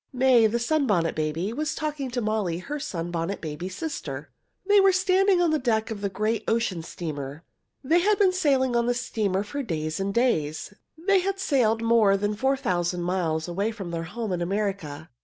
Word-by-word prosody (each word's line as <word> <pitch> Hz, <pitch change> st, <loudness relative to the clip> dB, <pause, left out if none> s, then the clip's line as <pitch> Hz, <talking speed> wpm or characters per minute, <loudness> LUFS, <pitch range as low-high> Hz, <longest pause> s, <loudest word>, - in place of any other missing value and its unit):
May, 250 Hz, -3 st, +5 dB
the 225 Hz, +2 st, 0 dB
Sunbonnet 235 Hz, -, +1 dB
Baby, 155 Hz, +7 st, -2 dB
was 305 Hz, +4 st, -2 dB
talking 300 Hz, -3 st, -3 dB
with 250 Hz, 0 st, -3 dB
Molly, 210 Hz, -6 st, -1 dB
her 280 Hz, +12 st, -5 dB
little 290 Hz, -, -6 dB
Sunbonnet 170 Hz, +2 st, -3 dB
Baby 160 Hz, +3 st, -5 dB
sister. 300 Hz, -, -5 dB, 0.3 s
They 410 Hz, +1 st, +5 dB
were 390 Hz, 0 st, +6 dB
standing 375 Hz, 0 st, +3 dB
on 335 Hz, -, +2 dB
the 310 Hz, -, +2 dB
deck 225 Hz, -3 st, 0 dB
of 205 Hz, -2 st, -6 dB
a 200 Hz, -, 0 dB
great 215 Hz, +3 st, -1 dB
ocean 225 Hz, -7 st, 0 dB
steamer. 150 Hz, -3 st, -6 dB, 0.4 s
They 320 Hz, +6 st, +3 dB
had 410 Hz, +3 st, +3 dB
been 385 Hz, -3 st, +4 dB
sailing 270 Hz, -8 st, +2 dB
on 235 Hz, 0 st, +2 dB
the 245 Hz, -, +1 dB
steamer 210 Hz, -5 st, -1 dB
for 285 Hz, +7 st, -4 dB
days 155 Hz, -, -3 dB
and 195 Hz, +1 st, -1 dB
days. 195 Hz, -8 st, 0 dB, 0.2 s
They 385 Hz, +4 st, +3 dB
had 390 Hz, +1 st, -1 dB
sailed 235 Hz, -, +1 dB
more 225 Hz, -4 st, +4 dB
than 205 Hz, +1 st, -1 dB
four 265 Hz, +5 st, +1 dB
thousand 175 Hz, -6 st, -1 dB
miles 170 Hz, -3 st, -1 dB
away 195 Hz, +5 st, -1 dB
from 200 Hz, -6 st, -6 dB
their 165 Hz, -1 st, -3 dB
home 220 Hz, +4 st, -4 dB
in 175 Hz, -1 st, -1 dB
America. 175 Hz, -6 st, -3 dB
215 Hz, 195 wpm, -26 LUFS, 175-275 Hz, 0.4 s, were